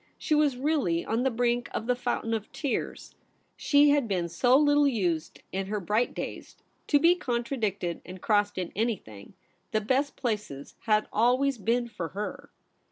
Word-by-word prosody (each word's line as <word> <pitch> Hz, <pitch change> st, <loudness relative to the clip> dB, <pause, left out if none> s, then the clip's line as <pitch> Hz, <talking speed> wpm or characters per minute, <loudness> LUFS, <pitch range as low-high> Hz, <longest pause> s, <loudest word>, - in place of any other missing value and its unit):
She -, -, -1 dB
was 300 Hz, -4 st, +3 dB
really 260 Hz, -, 0 dB
on 225 Hz, +2 st, 0 dB
the 265 Hz, -, +2 dB
brink 240 Hz, 0 st, 0 dB
of 220 Hz, -, -2 dB
the 250 Hz, +1 st, +1 dB
fountain 240 Hz, -2 st, -2 dB
of 220 Hz, -2 st, -3 dB
tears. 280 Hz, -5 st, -4 dB, 0.4 s
She 290 Hz, 0 st, +4 dB
had 285 Hz, -4 st, +2 dB
been 180 Hz, -4 st, -1 dB
so 245 Hz, +10 st, +4 dB
little 290 Hz, 0 st, +4 dB
used 175 Hz, -, -1 dB
in 190 Hz, 0 st, -3 dB
her 210 Hz, +1 st, -2 dB
bright 210 Hz, +6 st, 0 dB
days -, -, -6 dB, 0.3 s
to 290 Hz, -, +5 dB
be 335 Hz, +4 st, +5 dB
contradicted 235 Hz, -, -2 dB
and 185 Hz, +1 st, -10 dB
crossed 205 Hz, 0 st, +1 dB
in 180 Hz, -2 st, -3 dB
anything; 195 Hz, -, -4 dB, 0.3 s
the 215 Hz, -, +1 dB
best 265 Hz, +6 st, 0 dB
places 210 Hz, -, -4 dB
had 215 Hz, -1 st, +2 dB
always 250 Hz, +4 st, +2 dB
been 235 Hz, +3 st, 0 dB
for 180 Hz, -7 st, -5 dB
her. 210 Hz, -, -5 dB
230 Hz, 165 wpm, -28 LUFS, 200-265 Hz, 0.4 s, to